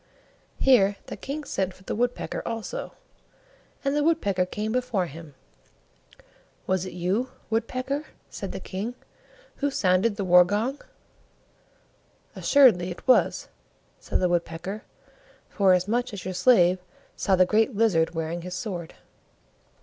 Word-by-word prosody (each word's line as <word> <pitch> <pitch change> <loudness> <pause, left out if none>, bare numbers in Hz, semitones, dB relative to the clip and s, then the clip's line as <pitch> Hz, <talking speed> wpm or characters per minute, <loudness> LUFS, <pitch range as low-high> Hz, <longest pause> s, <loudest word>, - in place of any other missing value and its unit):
Here 205 -7 +4
the - - -7
King 295 +3 -5
sent 190 -8 -2
for 185 - -19
the - - -4
Woodpecker 245 +2 -2
also, 230 - -5 0.9
and 275 +1 +1
the 295 - +2
Woodpecker 200 - +1
came 210 +3 -3
before 240 -6 0
him. 160 -2 -11 1.3
"Was 190 0 0
it - - -8
you, 185 +9 -1 0.2
Woodpecker," 255 +6 -2 0.2
said - - -6
the - - -5
King, 210 +6 -5 0.6
"who 285 - 0
sounded 200 -2 +2
the 200 -2 -3
war 180 0 +7
gong?" 220 +10 -2 1.5
"Assuredly 235 -11 +5
it 175 - -9
was," 255 - +3 0.5
said - - -2
the 180 - +3
Woodpecker, 175 +4 -2 0.7
"forasmuch 200 +5 +2
as 195 -3 -7
your 185 - -3
slave 185 -2 +4 0.4
saw 195 - +2
the 185 0 +5
Great 220 +5 +2
Lizard 180 -7 +2
wearing 165 +1 -3
his 180 +1 -6
sword." 180 -4 -5
200 Hz, 130 wpm, -26 LUFS, 180-245 Hz, 1.5 s, war